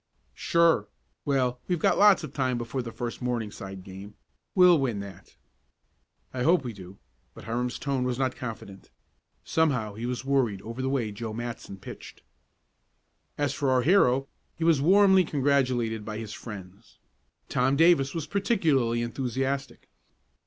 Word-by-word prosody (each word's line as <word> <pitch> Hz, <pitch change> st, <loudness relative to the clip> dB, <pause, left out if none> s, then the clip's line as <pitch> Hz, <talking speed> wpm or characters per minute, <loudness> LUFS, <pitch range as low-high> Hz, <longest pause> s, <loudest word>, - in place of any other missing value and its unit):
"Sure. 170 Hz, -1 st, +2 dB, 0.4 s
Well, 130 Hz, -4 st, 0 dB
we've 180 Hz, -, +1 dB
got -, -, +2 dB
lots 200 Hz, -4 st, +6 dB
of 150 Hz, -3 st, -7 dB
time 130 Hz, -3 st, 0 dB
before 120 Hz, +2 st, -3 dB
the 115 Hz, -1 st, -7 dB
first 120 Hz, 0 st, -5 dB
Morningside 105 Hz, -6 st, -4 dB
game. 100 Hz, +2 st, -10 dB, 0.4 s
We'll 180 Hz, -3 st, +6 dB
win 120 Hz, -7 st, -1 dB
that." 100 Hz, -2 st, -12 dB, 1.0 s
"I 125 Hz, -, -3 dB
hope 165 Hz, +3 st, +3 dB
we 120 Hz, -3 st, -5 dB
do," 95 Hz, -1 st, -12 dB, 0.4 s
but -, -, -11 dB
Hiram's 120 Hz, +2 st, -2 dB
tone 140 Hz, -3 st, -1 dB
was 125 Hz, -1 st, -1 dB
not 130 Hz, -1 st, -1 dB
confident. 110 Hz, -5 st, -8 dB, 0.5 s
Somehow 130 Hz, -10 st, 0 dB
he 115 Hz, +3 st, -5 dB
was 125 Hz, +1 st, -4 dB
worried 125 Hz, -8 st, 0 dB
over 115 Hz, +4 st, -6 dB
the 130 Hz, -, -1 dB
way 125 Hz, -6 st, -1 dB
Joe 110 Hz, +1 st, -6 dB
Matson 115 Hz, -3 st, -6 dB
pitched. 95 Hz, -, -11 dB, 1.1 s
As 145 Hz, -2 st, 0 dB
for 140 Hz, -2 st, -1 dB
our 130 Hz, -1 st, +3 dB
hero, 135 Hz, -6 st, +3 dB, 0.3 s
he 165 Hz, -, -4 dB
was 165 Hz, -4 st, +4 dB
warmly 190 Hz, +3 st, +5 dB
congratulated 130 Hz, -7 st, 0 dB
by 110 Hz, 0 st, -5 dB
his 110 Hz, -1 st, -6 dB
friends. 100 Hz, -4 st, -10 dB, 0.5 s
Tom 130 Hz, +2 st, +1 dB
Davis 160 Hz, -3 st, +4 dB
was 160 Hz, -3 st, -3 dB
particularly 150 Hz, -, +1 dB
enthusiastic. 135 Hz, +3 st, -3 dB
125 Hz, 150 wpm, -27 LUFS, 115-145 Hz, 1.1 s, lots